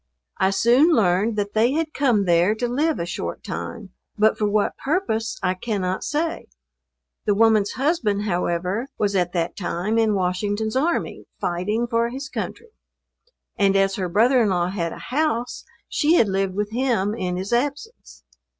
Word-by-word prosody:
I 190 Hz, -, +3 dB
soon 240 Hz, +9 st, +4 dB
learned 210 Hz, -, +2 dB
that 205 Hz, -1 st, -2 dB
they 230 Hz, +4 st, +3 dB
had 315 Hz, 0 st, -1 dB
come 240 Hz, -8 st, +2 dB
there 175 Hz, +4 st, +3 dB
to 245 Hz, +2 st, -2 dB
live 295 Hz, +6 st, 0 dB
a 170 Hz, -, -2 dB
short 175 Hz, -, -5 dB
time; 215 Hz, -6 st, -6 dB, 0.3 s
but 215 Hz, +1 st, +4 dB
for 210 Hz, -, 0 dB
what 205 Hz, 0 st, +1 dB
purpose 270 Hz, -, -1 dB
I 185 Hz, -, +2 dB
cannot 190 Hz, -2 st, -3 dB
say. 320 Hz, +3 st, -2 dB, 0.8 s
The 205 Hz, -, +2 dB
woman's 215 Hz, -2 st, +3 dB
husband, 255 Hz, -8 st, 0 dB
however, 180 Hz, +4 st, -1 dB
was 200 Hz, -1 st, 0 dB
at 175 Hz, -2 st, +1 dB
that 170 Hz, -2 st, -1 dB
time 195 Hz, +4 st, -1 dB
in 220 Hz, -2 st, +2 dB
Washington's 205 Hz, +4 st, -1 dB
army, 315 Hz, +6 st, -1 dB
fighting, 205 Hz, +7 st, -1 dB
for 235 Hz, -1 st, 0 dB
his 270 Hz, +3 st, -6 dB
country; 465 Hz, -, -6 dB, 0.9 s
and 195 Hz, -2 st, +3 dB
as 195 Hz, 0 st, +3 dB
her 185 Hz, -3 st, -2 dB
brother 240 Hz, +7 st, +4 dB
in 215 Hz, -, +2 dB
law 175 Hz, -1 st, +1 dB
had 170 Hz, -4 st, -2 dB
a -, -, -8 dB, 0.2 s
house 265 Hz, -5 st, -1 dB, 0.2 s
she 310 Hz, +3 st, +2 dB
had 235 Hz, -, +4 dB
lived 195 Hz, -1 st, -1 dB
with 210 Hz, +1 st, -2 dB
him 230 Hz, -5 st, 0 dB
in 180 Hz, -5 st, -3 dB
his 190 Hz, +5 st, -3 dB
absence. 290 Hz, -, -3 dB
215 Hz, 170 wpm, -23 LUFS, 190-245 Hz, 0.9 s, soon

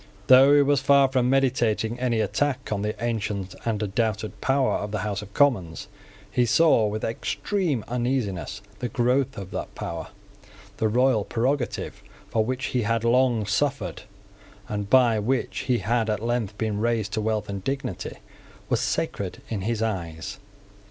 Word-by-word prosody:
Though 135 Hz, +4 st, +7 dB
he 145 Hz, -, +6 dB
was 140 Hz, -1 st, +2 dB
far 140 Hz, 0 st, +5 dB
from 130 Hz, -2 st, +1 dB
meditating 120 Hz, -4 st, +1 dB
any 120 Hz, -3 st, +1 dB
attack 135 Hz, +5 st, -1 dB
on 100 Hz, -2 st, -1 dB
the 105 Hz, +1 st, -2 dB
ancient 105 Hz, -5 st, -2 dB
and 110 Hz, -2 st, -1 dB
undoubted 105 Hz, +1 st, -2 dB
power 135 Hz, 0 st, +2 dB
of 105 Hz, -, -4 dB
the 105 Hz, -1 st, -3 dB
House 100 Hz, -1 st, -2 dB
of 105 Hz, -1 st, -11 dB
Commons, 100 Hz, -, +2 dB, 0.4 s
he 125 Hz, -, +2 dB
saw 115 Hz, -1 st, +4 dB
with 105 Hz, +1 st, -4 dB
extreme 120 Hz, -, -1 dB
uneasiness 120 Hz, -6 st, -2 dB, 0.2 s
the 125 Hz, -, -3 dB
growth 125 Hz, +3 st, +1 dB
of 95 Hz, -2 st, -7 dB
that -, -, -5 dB
power. 80 Hz, -2 st, -5 dB, 0.7 s
The 110 Hz, -, +1 dB
royal 125 Hz, -1 st, +3 dB
prerogative, 125 Hz, +4 st, -2 dB, 0.3 s
for 110 Hz, -, +2 dB
which 130 Hz, +3 st, -2 dB
he 125 Hz, -, +2 dB
had 115 Hz, 0 st, 0 dB
long 120 Hz, -2 st, +3 dB
suffered, 100 Hz, -, -1 dB, 0.7 s
and 105 Hz, -1 st, -4 dB
by 120 Hz, -4 st, +5 dB
which 125 Hz, +5 st, -1 dB
he 125 Hz, -, +4 dB
had 115 Hz, +2 st, 0 dB
at 105 Hz, 0 st, -1 dB
length 115 Hz, -4 st, -1 dB
been 110 Hz, -2 st, -1 dB
raised 110 Hz, -2 st, 0 dB
to 110 Hz, -, 0 dB
wealth 110 Hz, 0 st, -1 dB
and 100 Hz, -1 st, -5 dB
dignity, 135 Hz, -9 st, -3 dB, 0.6 s
was -, -, +2 dB
sacred -, -, -2 dB
in 110 Hz, -4 st, -2 dB
his 115 Hz, +2 st, -1 dB
eyes. 95 Hz, -3 st, -4 dB
115 Hz, 160 wpm, -25 LUFS, 105-130 Hz, 0.7 s, Though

